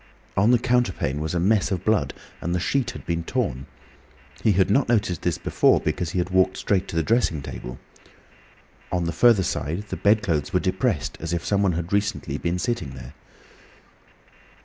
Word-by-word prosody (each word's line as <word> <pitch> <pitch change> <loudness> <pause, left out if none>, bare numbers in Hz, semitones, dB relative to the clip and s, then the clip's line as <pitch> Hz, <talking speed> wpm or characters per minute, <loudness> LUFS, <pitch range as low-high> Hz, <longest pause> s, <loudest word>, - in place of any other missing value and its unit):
On 100 +3 +3
the 125 - +6
counterpane 120 - 0
was 80 +2 -3
a - - +1
mess 100 +2 +2
of 95 -3 -3
blood, - - +1 0.3
and 85 +2 -1
the - - +1
sheet 120 +8 0
had - - -8
been 85 -1 -2
torn. 80 - -2 0.7
He 110 - +3
had 95 0 +2
not 130 +3 +2
noticed 100 -8 +1
this - - 0
before - - +3
because 90 - -2
he 90 - -4
had 90 +1 -1
walked 95 0 +3
straight 95 -3 0
to - - -7
the 80 - +2
dressing 100 - +1
table. 60 +1 -7 1.1
On 90 -1 0
the 85 - -1
further 105 +3 +4
side 80 +5 -2
the - - -4
bedclothes 100 -8 +1
were - - +4
depressed - - -1
as 80 +1 -3
if 85 - -2
someone 100 -2 +2
had 85 0 -3
been 100 - +3
recently 100 -4 -2
sitting 90 - -3
there. - - -10
90 Hz, 185 wpm, -24 LUFS, 85-105 Hz, 1.1 s, the